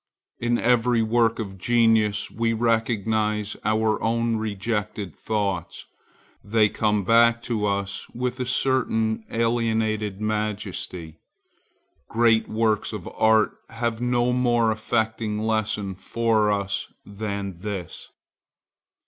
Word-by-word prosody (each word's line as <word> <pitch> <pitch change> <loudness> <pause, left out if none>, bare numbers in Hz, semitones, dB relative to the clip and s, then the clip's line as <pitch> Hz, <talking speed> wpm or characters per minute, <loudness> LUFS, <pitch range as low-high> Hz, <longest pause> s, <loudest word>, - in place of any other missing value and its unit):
In 120 0 +1
every 120 -1 +2
work 115 0 +2
of 95 -4 -6
genius 110 -1 +2
we 115 0 0
recognize 110 -2 0
our 110 0 +1
own 115 0 +1
rejected 105 -3 -3
thoughts; 100 -5 -3 0.6
they 110 0 +3
come 105 -1 0
back 115 +3 +5
to 110 -4 -1
us 100 -1 -3
with 125 +1 -3
a 125 - -1
certain 115 -4 +1
alienated 110 -3 0
majesty. 105 -6 -4 0.9
Great 115 -1 +3
works 110 -1 0
of - - -6
art 110 -1 +3 0.2
have 115 0 -3
no 125 0 +1
more 120 -2 +2
affecting 110 0 -1
lesson 110 -2 -1
for 110 +2 +1
us 100 -1 -2
than 100 -3 -5
this. 95 -3 -6
110 Hz, 105 wpm, -24 LUFS, 105-115 Hz, 0.9 s, back